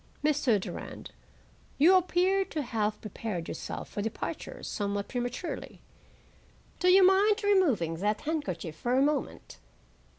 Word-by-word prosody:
Mr. 280 -7 +2
Durand, - - -7 0.7
you 325 +7 +6
appear 370 +2 +3
to 320 -5 -4
have 215 -3 -1
prepared 205 -5 -5
yourself - - -6
for 205 - -5
departure 220 +2 -5
somewhat 200 -1 -2
prematurely. 245 +7 -4 1.0
Do 360 - +1
you 370 +1 +7
mind 410 +3 +4
removing 280 - +2
that 210 +4 -1
handkerchief 290 - -3
for 240 +9 -1
a 265 - +4
moment? 295 0 -2
265 Hz, 125 wpm, -29 LUFS, -, 1.0 s, you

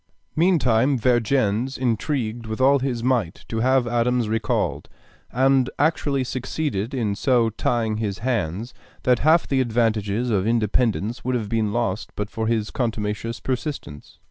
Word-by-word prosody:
Meantime 140 -7 +3
Vergennes 120 0 +1
intrigued 120 -2 -1
with 110 +2 -4
all 135 +2 +5
his 125 -3 -2
might 120 -9 0
to 115 - -3
have 130 +1 +3
Adams 120 0 +1
recalled, 110 - -1 0.4
and 130 0 +3
actually 145 -3 +1
succeeded 130 -3 -3
in 110 -5 0
so 115 +1 +2
tying 110 0 -1
his 105 -3 -2
hands 115 -2 -2 0.3
that 125 -2 +3
half 160 +3 +4
the 135 -1 +2
advantages 115 -1 0
of 100 -1 +1
independence 115 0 0
would 130 0 0
have 110 -4 -2
been 110 -2 0
lost 110 -2 -1
but 105 0 -4
for 110 0 -2
his 110 -2 0
contumacious 115 -1 -2
persistence. 130 - -5
120 Hz, 145 wpm, -23 LUFS, 110-130 Hz, 0.4 s, all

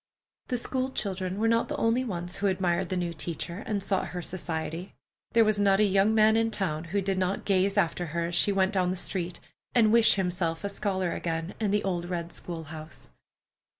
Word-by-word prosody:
The 250 - 0
school 260 +2 -1
children 190 -6 -3
were 225 +2 +1
not 230 +1 +2
the - - -3
only 230 +3 +2
ones 180 -6 -4
who 200 - +1
admired 185 -1 0
the 185 - -1
new 175 -1 -2
teacher, 170 +2 -5
and 205 -4 -1
sought 195 -1 0
her 180 - -5
society. 170 0 -4 0.4
There 230 -1 +6
was 215 -1 +2
not 200 -1 +4
a - - +5
young 200 +2 +3
man 220 0 +5
in 225 0 +2
town 175 -7 -2
who 195 +4 -1
did 190 0 0
not 185 +1 -1
gaze 195 0 +2
after 175 -2 +1
her 170 +2 -2
as - - -7
she 200 - +5
went 195 +1 +2
down 185 -2 +2
the 185 - -1
street, 180 -1 -2 0.4
and 220 -3 +5
wish 230 -1 +6
himself 175 -3 -1
a 200 - -1
scholar 190 -3 -1
again 165 +1 -3
in 215 -2 0
the 205 +1 +1
old 175 -3 -1
red 170 -1 -4
school 170 -2 -6
house. 155 0 -9
190 Hz, 215 wpm, -28 LUFS, 175-205 Hz, 0.4 s, There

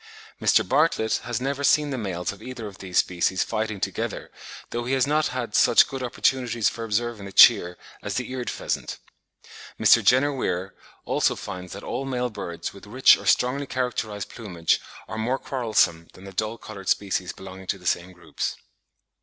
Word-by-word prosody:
Mr. - - +3
Bartlett 150 -8 +2
has 120 -1 -2
never 140 +2 -2
seen 150 0 +3
the - - -1
males 90 -5 -3
of 100 - -13
either 125 -3 -7
of 100 -1 -9
these 95 -2 -4
species 90 +1 +2
fighting 110 -2 -3
together, - - -3 0.4
though 120 0 -3
he 130 - -1
has 130 - +3
not 150 +2 +2
had 120 -4 -4
such 115 - +6
good 135 -1 -6
opportunities 120 -2 0
for 115 - -3
observing 115 -1 -2
the - - -9
Cheer 95 -6 +7 0.2
as - - -4
the 130 0 -3
Eared 125 -2 -3
pheasant. - - -3 0.8
Mr. - - +6
Jenner 140 +3 +4
Weir, 95 -7 -2 0.3
also, - - +1
finds 90 -1 -7
that - - -8
all 135 - -3
male 125 -2 -2
birds 85 -5 -6
with 100 +1 -13
rich 130 +5 +6
or 100 - -8
strongly 130 +7 +2
characterised 110 -6 -3
plumage 90 -8 -1 0.3
are 110 - -5
more 125 +4 0
quarrelsome 110 -12 0
than 95 - -15
the 95 0 -10
dull 110 +4 -2
coloured 100 -4 -8
species 95 -3 0
belonging 95 0 -11
to 100 - -1
the 90 - -17
same 90 +1 0
groups. 85 -5 -4
110 Hz, 180 wpm, -25 LUFS, 95-125 Hz, 0.8 s, Cheer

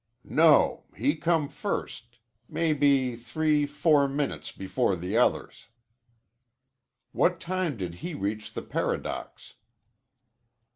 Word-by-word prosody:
"No, 155 -2 +4
he 140 +8 +1
come 165 -2 +1
first. 140 - -5 0.3
Maybe 140 -6 +2
three 150 +5 0
four 145 -1 +3
minutes 140 +1 -3
before 95 +2 -1
the 90 +1 -4
others." - - 0 1.4
"What - - +2
time 180 -6 -2
did 90 -4 -4
he 175 -3 -5
reach 105 -3 -4
the - - -4
Paradox?" - - -4
145 Hz, 100 wpm, -27 LUFS, 120-155 Hz, 1.4 s, No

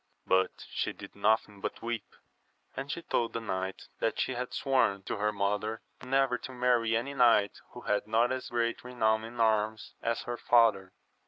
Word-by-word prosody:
But 95 0 +1
she - - -1
did - - -11
nothing 105 0 +1
but - - -4
weep, 115 -1 -4 0.6
and 135 +2 -4
she 170 - -4
told 115 -1 0
the - - -1
knight 95 -3 -3 0.2
that 115 - 0
she 130 - 0
had 125 +1 -4
sworn 130 -8 +1
to 105 - -3
her 105 +1 +1
mother 105 +2 -1 0.2
never 135 -2 +1
to - - -8
marry 120 -3 +2
any 135 +5 -3
knight 115 -6 +4
who - - -9
had 105 0 0
not 115 +3 +3
as 130 0 -3
great 115 -1 -1
renown 110 -3 +1
in 115 +1 -9
arms 110 -1 +1
as 115 0 -1
her 120 0 -4
father. 110 -7 +3
115 Hz, 180 wpm, -30 LUFS, 105-125 Hz, 0.6 s, knight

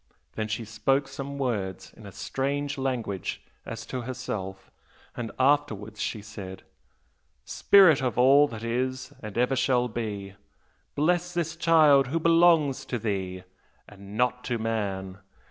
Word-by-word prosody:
Then 110 -1 -3
she 110 +1 -3
spoke 135 +6 0
some 140 0 -6
words 105 -9 -3
in 110 - -12
a - - -9
strange 140 +6 -2
language 120 -8 -3 0.3
as 115 0 -6
to 130 - -4
herself, 105 -6 -6 0.4
and 120 -2 -4
afterwards 130 -7 +1
she 105 -3 -3
said, 100 -3 -9 0.8
'Spirit 185 -9 +5
of 125 -3 -1
all 135 +4 +6
that 115 -4 -8
is 130 +3 -2
and 105 -1 -7
ever 125 +2 +2
shall 125 -1 +2
be, 105 -4 -5 0.6
bless 175 +3 +1
this 170 -1 -1
child 155 -5 +5
who 165 +6 -1
belongs 165 -5 +4
to 125 - -3
thee, 95 -4 -3 0.4
and 100 +1 -11
not 125 +1 +1
to 120 - -1
man! 100 -4 -3
125 Hz, 140 wpm, -27 LUFS, 105-140 Hz, 0.8 s, all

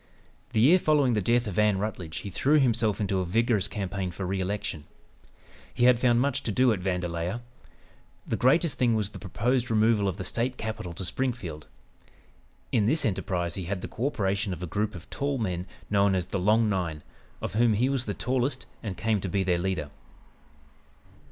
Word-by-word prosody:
The - - +2
year 165 +10 +6
following 145 -6 +3
the 105 - +1
death 120 +5 +2
of 100 -2 -2
Ann 105 -2 +4
Rutledge 95 -5 -4
he 100 - -7
threw 140 - +3
himself 115 -5 +2
into 100 -2 0
a - - 0
vigorous 110 +2 +1
campaign 100 -2 -3
for 90 +2 -5
re 95 +1 -1
election. 95 -5 -3 0.9
He 120 - -1
had 125 -1 +6
found 120 -1 +3
much 140 0 +1
to 115 - -2
do 125 +3 +4
at 100 - -3
Vandalia. 90 +3 -2 0.8
The - - -1
greatest 145 +5 +2
thing 120 -3 +3
was 105 -2 -1
the - - -9
proposed 120 +6 0
removal 110 -2 +3
of 95 - -2
the - - -4
State 120 +7 -1
capital 110 -6 -5
to 95 - -4
Springfield. 100 - -3 1.0
In 105 -4 +2
this 155 +6 +2
enterprise 90 -4 -1
he 95 -1 -4
had 95 +1 -3
the - - -5
co 125 - -2
operation 100 -5 -1
of 90 0 -7
a - - -1
group 105 +4 -2
of 85 - -10
tall 140 0 -1
men, 90 -5 -2 0.2
known 100 -1 +3
as 90 -2 0
"the 95 +1 -3
Long 110 +4 +3
Nine," 85 -7 -2 0.4
of - - -4
whom 115 +1 +4
he 115 +5 +2
was 135 -2 -1
the 105 - -2
tallest 130 +1 -1 0.2
and 100 -4 -5
came 110 -3 0
to 95 - -3
be 95 +2 +1
the 90 -1 +2
leader. 85 -5 -2
105 Hz, 195 wpm, -27 LUFS, 95-120 Hz, 1.0 s, year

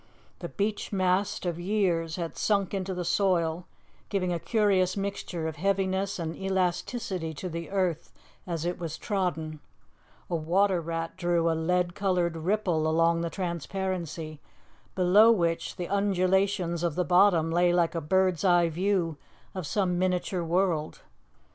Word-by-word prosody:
The - - -6
beech 205 0 -2
mast 190 0 0
of 175 -1 -2
years 175 -4 0
had 170 -2 -4
sunk 200 -3 0
into 190 -1 -2
the 180 -1 -3
soil, 175 -2 +1 0.4
giving 185 -3 0
a 170 - -2
curious 195 -3 +2
mixture 195 -4 -3
of 160 -1 -5
heaviness 195 +2 0
and 165 -2 -4
elasticity 190 -1 -2
to 185 - -5
the 170 -1 -5
earth 185 -5 -1 0.4
as 170 -2 -3
it 175 +1 -2
was 165 -3 -5
trodden; 160 -6 -2 0.7
a 175 - -2
water 180 +3 +2
rat 165 0 -4
drew 170 -2 +1
a - - +1
lead 175 +2 0
coloured 180 -4 0
ripple 170 -2 0
along 165 +1 +2
the 170 - -2
transparency, 170 -3 -4 0.5
below 195 +5 +6
which 170 -6 0
the 180 -2 -4
undulations 190 -2 +1
of 170 -4 -1
the 180 - 0
bottom 175 -3 +4
lay 175 +1 +3
like 175 -1 +2
a 165 - -2
bird's 185 +2 +1
eye 175 -3 +4
view 175 -2 0 0.4
of 185 -5 -5
some 180 -2 0
miniature 180 -1 0
world. 165 -2 0
180 Hz, 150 wpm, -28 LUFS, 165-190 Hz, 0.7 s, below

